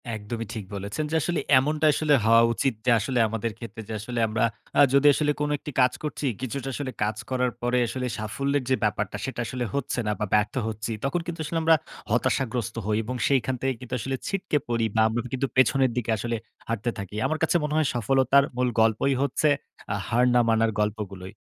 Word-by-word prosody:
একদমই 110 Hz, +2 st, -5 dB
ঠিক 110 Hz, -4 st, -5 dB
বলেছেন। 100 Hz, +9 st, -3 dB
যে -, -, 0 dB
আসলে 175 Hz, +2 st, -1 dB, 0.2 s
এমনটা 150 Hz, +3 st, 0 dB
আসলে 150 Hz, -1 st, +2 dB
হওয়া 115 Hz, +1 st, +6 dB
উচিত 135 Hz, +2 st, 0 dB
যে 125 Hz, -, +4 dB
আসলে 125 Hz, +3 st, -1 dB
আমাদের 115 Hz, +1 st, -2 dB
ক্ষেত্রে 115 Hz, -1 st, -8 dB
যে -, -, -3 dB
আসলে 120 Hz, +3 st, -4 dB
আমরা 110 Hz, 0 st, 0 dB, 0.4 s
আ -, -, +9 dB
যদি 140 Hz, +1 st, +5 dB
আসলে 150 Hz, -1 st, +1 dB
কোন 150 Hz, -, 0 dB
একটি 150 Hz, -, -8 dB
কাজ 125 Hz, -, +4 dB
করছি, 150 Hz, -1 st, -3 dB, 0.2 s
কিছুটা 135 Hz, +1 st, -4 dB
আসলে 135 Hz, 0 st, -4 dB
কাজ 105 Hz, 0 st, -1 dB
করার 125 Hz, -1 st, +1 dB
পরে 120 Hz, +1 st, +1 dB
আসলে 130 Hz, +2 st, -3 dB
সাফল্যের 140 Hz, +6 st, -1 dB
যে 130 Hz, -, +4 dB
ব্যাপারটা 105 Hz, -2 st, -1 dB
সেটা 135 Hz, -, -5 dB
আসলে 125 Hz, +1 st, -3 dB
হচ্ছে 140 Hz, -2 st, -2 dB
না 105 Hz, -, +2 dB
বা 105 Hz, -, 0 dB
ব্যর্থ 105 Hz, +1 st, +2 dB
হচ্ছি। 110 Hz, +1 st, -4 dB
তখন 170 Hz, +5 st, 0 dB
কিন্তু 170 Hz, -1 st, -5 dB
আসলে 165 Hz, -, -2 dB
আমরা 160 Hz, 0 st, +6 dB, 0.4 s
হতাশাগ্রস্ত 120 Hz, -2 st, 0 dB
হই 105 Hz, 0 st, +1 dB
এবং 125 Hz, +4 st, -4 dB
সেখান 130 Hz, -2 st, +1 dB
থেকে 135 Hz, 0 st, +1 dB
কিন্তু 125 Hz, 0 st, -8 dB
আসলে 135 Hz, +4 st, -2 dB
ছিটকে 190 Hz, -6 st, 0 dB
পড়ি 115 Hz, -1 st, 0 dB
বা 110 Hz, -, +4 dB
আমরা 115 Hz, +2 st, -1 dB
কিন্তু 130 Hz, +1 st, 0 dB
পেছনের 130 Hz, +1 st, +4 dB
দিকে 115 Hz, -2 st, 0 dB
আসলে 120 Hz, +2 st, -2 dB, 0.3 s
হাঁটতে 115 Hz, +1 st, -1 dB
থাকি। 100 Hz, +1 st, -7 dB
আমার 155 Hz, -, 0 dB
কাছে 160 Hz, -, +2 dB
মনে 150 Hz, 0 st, -2 dB
হয় 155 Hz, -2 st, +3 dB
সফলতার 130 Hz, +4 st, +4 dB
মূল 125 Hz, 0 st, +2 dB
গল্পই 110 Hz, +5 st, +3 dB
হচ্ছে 140 Hz, +2 st, +2 dB, 0.4 s
আ -, -, 0 dB
হার 120 Hz, +2 st, +3 dB
না 125 Hz, -, +5 dB
মানার 115 Hz, 0 st, +3 dB
গল্পগুলোই। 100 Hz, -3 st, -3 dB
125 Hz, 205 wpm, -26 LUFS, 110-140 Hz, 0.4 s, আ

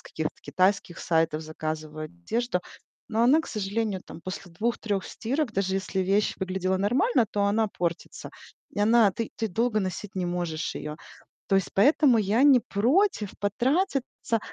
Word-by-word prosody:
каких-то 155 Hz, -1 st, -4 dB
китайских 185 Hz, -2 st, 0 dB
сайтов 160 Hz, -2 st, +1 dB
заказываю 155 Hz, 0 st, -5 dB
одежду, 180 Hz, +6 st, -2 dB, 0.5 s
но 225 Hz, 0 st, +1 dB
она, 270 Hz, +7 st, +5 dB
к -, -, -9 dB
сожалению, 205 Hz, -1 st, -2 dB
там, -, -, -11 dB
после 185 Hz, 0 st, -7 dB
2-3 210 Hz, 0 st, -1 dB
стирок, 260 Hz, +1 st, -2 dB
даже 190 Hz, -1 st, 0 dB
если 190 Hz, 0 st, -1 dB
вещь 195 Hz, +3 st, +1 dB
выглядела 190 Hz, 0 st, -1 dB
нормально, 240 Hz, -, +2 dB
то 205 Hz, 0 st, 0 dB
она 215 Hz, +2 st, +2 dB
портится, 175 Hz, -4 st, -4 dB, 0.4 s
и -, -, -8 dB
она 220 Hz, 0 st, +5 dB
ты 225 Hz, +4 st, -4 dB
ты 225 Hz, -, -1 dB
долго 225 Hz, +2 st, +1 dB
носить 190 Hz, +1 st, -4 dB
не 185 Hz, -2 st, -1 dB
можешь 175 Hz, -3 st, -2 dB
её. 150 Hz, 0 st, -5 dB, 0.5 s
То 195 Hz, -, +3 dB
есть 195 Hz, -, +1 dB
поэтому 265 Hz, +3 st, +5 dB
я 215 Hz, +3 st, +2 dB
не 280 Hz, -3 st, +7 dB
против 240 Hz, -, +1 dB
потратиться. 260 Hz, -, 0 dB
200 Hz, 155 wpm, -27 LUFS, 180-230 Hz, 0.5 s, не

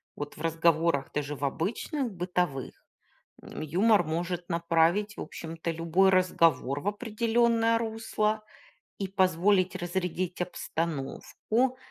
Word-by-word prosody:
Вот 145 Hz, 0 st, -6 dB
в -, -, -11 dB
разговорах, 165 Hz, -2 st, +2 dB
даже 150 Hz, 0 st, -2 dB
в 140 Hz, +1 st, -3 dB
обычных, 230 Hz, -, -2 dB
бытовых, 180 Hz, -6 st, -3 dB, 0.6 s
м, -, -, -9 dB
юмор 190 Hz, +6 st, +3 dB
может 175 Hz, +2 st, -3 dB
направить, 170 Hz, +5 st, +2 dB
в -, -, -6 dB
общем-то, 165 Hz, 0 st, -5 dB
любой 165 Hz, +4 st, +3 dB
разговор 165 Hz, -7 st, +2 dB
в 200 Hz, -, -2 dB
определённое 230 Hz, +1 st, +2 dB
русло 220 Hz, -1 st, -1 dB, 0.5 s
и 195 Hz, -, -3 dB
позволить 185 Hz, 0 st, +2 dB
разрядить 180 Hz, 0 st, -2 dB
обстановку 175 Hz, -, -2 dB
180 Hz, 110 wpm, -28 LUFS, 165-210 Hz, 0.6 s, юмор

